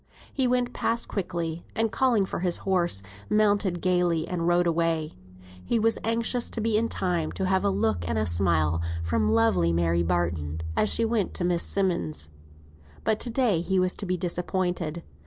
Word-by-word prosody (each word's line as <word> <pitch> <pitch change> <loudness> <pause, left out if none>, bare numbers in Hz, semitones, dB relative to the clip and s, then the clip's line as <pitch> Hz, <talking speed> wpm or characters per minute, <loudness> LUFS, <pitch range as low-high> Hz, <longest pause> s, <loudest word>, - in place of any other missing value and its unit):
He 265 -2 +2
went 245 0 0
past 230 +1 -1
quickly, 170 -4 -3
and 225 -1 +1
calling 240 -7 +2
for - - -4
his 180 -1 +1
horse, 175 - +1 0.3
mounted 205 -4 +2
gaily, 175 -3 +1
and 170 -2 -2
rode 175 0 +3
away. 165 -2 0 0.5
He 235 - 0
was 225 0 +2
anxious 230 +2 +1
to - - -3
be 220 0 +1
in 230 +2 +1
time 175 -4 -1
to 190 - -2
have 190 0 +1
a 200 - +2
look 105 - 0
and 80 - 0
a - - +1
smile 85 -2 +1 0.2
from 85 +6 +1
lovely 100 -7 +3
Mary 85 0 +1
Barton, 85 -3 -1
as 215 - +2
she 230 - +3
went 225 -3 -1
to - - -2
Miss 175 -1 +1
Simmonds'. 170 - 0 0.7
But 220 -1 +1
to 245 - -2
day 230 -8 +1
he 190 +2 -1
was 185 0 +2
to 200 - -5
be 180 0 0
disappointed. 175 -2 -2
175 Hz, 180 wpm, -26 LUFS, -, 0.7 s, rode